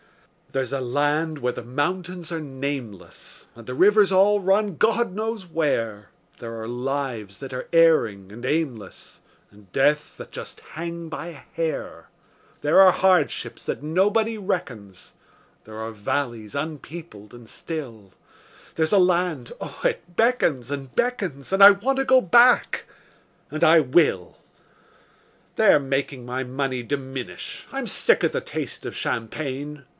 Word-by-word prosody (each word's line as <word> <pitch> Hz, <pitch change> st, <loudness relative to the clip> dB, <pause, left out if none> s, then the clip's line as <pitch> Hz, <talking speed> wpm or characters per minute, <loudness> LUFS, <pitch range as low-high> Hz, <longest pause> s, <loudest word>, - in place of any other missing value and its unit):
There's 135 Hz, 0 st, -2 dB
a 135 Hz, -, -1 dB
land 145 Hz, +5 st, 0 dB
where 125 Hz, -3 st, -1 dB
the -, -, -7 dB
mountains 175 Hz, +7 st, -3 dB
are 165 Hz, -2 st, -3 dB
nameless, 135 Hz, -8 st, -7 dB
And 115 Hz, -1 st, -14 dB
the 125 Hz, -, -5 dB
rivers 205 Hz, +4 st, +5 dB
all 200 Hz, +2 st, +4 dB
run 195 Hz, 0 st, +2 dB
God 225 Hz, +2 st, +1 dB
knows 220 Hz, -1 st, -3 dB
where; 115 Hz, -, -2 dB, 0.3 s
There 115 Hz, -1 st, -7 dB
are 110 Hz, -, -6 dB
lives 120 Hz, -5 st, -4 dB
that 135 Hz, -1 st, -8 dB
are 125 Hz, -, -6 dB
erring 115 Hz, -, +3 dB
and 120 Hz, +3 st, -10 dB
aimless, 130 Hz, -9 st, -3 dB, 0.3 s
And 100 Hz, -3 st, -20 dB
deaths 150 Hz, +5 st, +2 dB
that -, -, -11 dB
just -, -, -8 dB
hang 170 Hz, +1 st, -5 dB
by 160 Hz, -, -6 dB
a -, -, -6 dB, 0.2 s
hair; 165 Hz, -1 st, -4 dB, 0.5 s
There 150 Hz, +6 st, +6 dB
are 190 Hz, -1 st, +8 dB
hardships 185 Hz, -4 st, +1 dB
that -, -, -3 dB
nobody 205 Hz, +8 st, +1 dB
reckons; 115 Hz, -, -5 dB, 0.5 s
There 110 Hz, 0 st, -10 dB
are 110 Hz, 0 st, -4 dB
valleys 110 Hz, 0 st, -3 dB
unpeopled 150 Hz, -6 st, -7 dB
and 120 Hz, -2 st, -13 dB
still; 115 Hz, -, -7 dB, 0.6 s
There's 160 Hz, -1 st, +1 dB
a 205 Hz, -, +5 dB
land 175 Hz, -7 st, +1 dB
oh, -, -, -7 dB
it 175 Hz, +1 st, -2 dB
beckons 170 Hz, -, +2 dB
and 135 Hz, -3 st, -5 dB
beckons, 190 Hz, -, -2 dB
And 195 Hz, +1 st, +6 dB
I 200 Hz, -, +13 dB
want 240 Hz, +7 st, 0 dB
to 270 Hz, -, +1 dB
go 260 Hz, -1 st, +6 dB
back 240 Hz, +7 st, +4 dB, 0.7 s
and 155 Hz, -, -2 dB
I 160 Hz, +1 st, +7 dB
will. 130 Hz, -, +2 dB, 1.2 s
They're -, -, +6 dB
making 135 Hz, -2 st, -3 dB
my 125 Hz, +2 st, -3 dB
money 130 Hz, 0 st, -2 dB
diminish; 130 Hz, -7 st, -6 dB
I'm -, -, -4 dB
sick -, -, +2 dB
of -, -, +2 dB
the -, -, -1 dB
taste -, -, -6 dB
of -, -, -5 dB
champagne. 140 Hz, +4 st, -4 dB
145 Hz, 145 wpm, -24 LUFS, 125-180 Hz, 1.2 s, I